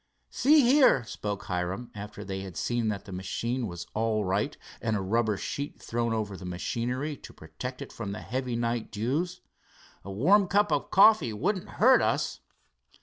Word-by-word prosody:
"See 300 +3 +5
here," 255 - +5
spoke 105 -3 -5
Hiram, 90 +6 -3
after 105 0 -8
they 95 0 -4
had 95 -4 -8
seen 120 -2 0
that 105 -2 -3
the - - -10
machine 115 +6 -2
was 85 -2 -7
all 110 -1 0
right 95 +3 -1 0.2
and 110 -1 0
a - - 0
rubber 105 +2 +1
sheet 140 +8 -5
thrown 115 0 -2
over 105 -3 -2
the 95 - -10
machinery 120 +11 -3
to - - -12
protect 80 +12 -7
it - - -12
from 105 -4 -5
the 105 - -6
heavy 125 0 -3
night 115 -1 -2
dews, 150 - -2 0.6
"a 100 - -7
warm 185 - +4
cup 205 +3 +2
coffee 200 - +6
wouldn't 190 - -1
hurt 255 +4 +6
us." - - 0
115 Hz, 170 wpm, -28 LUFS, 100-140 Hz, 0.6 s, coffee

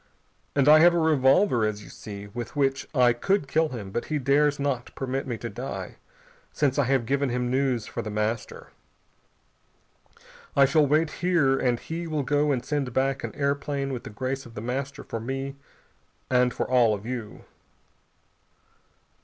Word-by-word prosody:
And 140 -1 +3
I 155 +1 +9
have 175 +2 +6
a - - +2
revolver, 145 - +3
as 105 -1 -2
you - - -13
see, 100 -2 -8
with 115 +3 -7
which 135 -1 0
I 125 -2 +5
could 190 +6 0
kill 160 +3 +2
him, 105 -7 -7
but 120 - -3
he 155 - -1
dares 145 +2 +2
not 140 -4 -2
permit 135 +1 -3
me 120 -3 -3
to 115 - -5
die, 125 +5 -6 0.5
since 145 -1 0
I 140 - +3
have 130 -2 +1
given 140 +2 0
him 125 0 -1
news 130 -4 0
for - - -5
The 110 - -5
Master. 105 +1 -3 1.9
I 140 - +6
shall 145 +2 +3
wait 155 +2 +2
here 170 -7 +3
and 120 -2 +1
he 165 +1 -5
will 155 -3 -1
go 145 +2 +1
and 125 -3 -1
send 145 -4 -1
back 135 +1 0
an - - -5
airplane 140 -1 -1
with 125 - -5
the - - -8
grace 130 +5 -4
of 115 - -15
The - - -5
Master 135 +4 -4
for 115 - -5
me 135 +4 -4 0.8
and 125 -1 +4
for - - -3
all 120 -4 +4
of 100 +1 -10
you." 120 -4 -6
135 Hz, 180 wpm, -26 LUFS, 120-145 Hz, 1.9 s, I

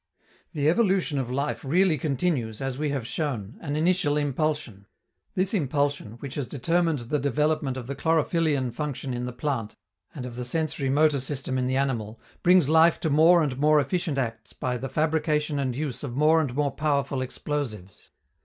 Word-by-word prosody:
The 145 -1 0
evolution 185 -5 +2
of 125 -2 -3
life 140 +4 -2
really 170 +5 +3
continues, 140 -7 -1
as 135 -1 -3
we 150 +2 -1
have 140 -5 -2
shown, 120 -7 -3
an 145 -2 -3
initial 155 -2 +2
impulsion: 145 -8 -2 0.5
this 185 +2 +1
impulsion, 145 - 0
which 130 +3 -8
has 140 -4 -3
determined 165 +3 +1
the 135 +6 -1
development 145 0 0
of 125 - -6
the 140 - -4
chlorophyllian 155 -4 +1
function 140 -1 -4
in 125 0 -3
the - - -4
plant 125 -3 -3 0.4
and 125 - -5
of 120 -1 -8
the - - -3
sensori 140 0 -1
motor 150 0 +3
system 135 -1 -2
in 125 - 0
the 130 +1 0
animal, 115 -5 -2 0.2
brings 180 -4 +5
life 160 +2 +5
to 160 - 0
more 165 +3 +6
and 135 -3 -2
more 150 +1 +5
efficient 155 +1 -1
acts 115 -4 -3
by 125 -1 -2
the 130 +2 -4
fabrication 150 -1 0
and 130 -3 -1
use 140 -2 -3
of 125 -4 -5
more 155 +2 +5
and 130 -5 -3
more 145 -1 +1
powerful 140 -3 0
explosives. 125 -8 -5
145 Hz, 180 wpm, -26 LUFS, 130-155 Hz, 0.5 s, more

